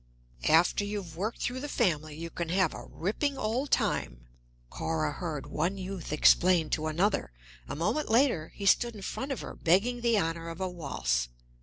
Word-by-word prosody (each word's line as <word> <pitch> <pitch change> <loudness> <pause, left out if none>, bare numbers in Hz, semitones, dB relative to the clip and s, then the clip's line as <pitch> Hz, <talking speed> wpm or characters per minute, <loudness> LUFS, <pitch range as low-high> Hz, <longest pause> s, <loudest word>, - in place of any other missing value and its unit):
"After 170 +5 +4
you've 205 -5 -5
worked 210 +7 -3
through 250 +1 -2
the 290 +2 -5
family, 155 - 0
you 165 +1 -6
can 170 -1 -4
have 185 -1 +2
a - - -8
ripping 270 - -2
old 245 +6 -1
time," - - 0 0.5
Cora 80 -1 -1
heard 155 -5 -4
one 175 +6 -1
youth 190 -3 -6
explain 165 +2 +4
to 155 0 0
another; 175 - +1 0.4
a - - -4
moment 175 - 0
later 230 - +3
he 200 - -5
stood 235 +3 +4
in 200 - -9
front 270 +7 -4
of 270 - -3
her, - - -7
begging 215 +9 +2
the 235 -2 +3
honor 165 -2 -1
of 165 +1 -7
a 190 - -1
waltz. 60 - -1
180 Hz, 180 wpm, -29 LUFS, 155-215 Hz, 0.5 s, After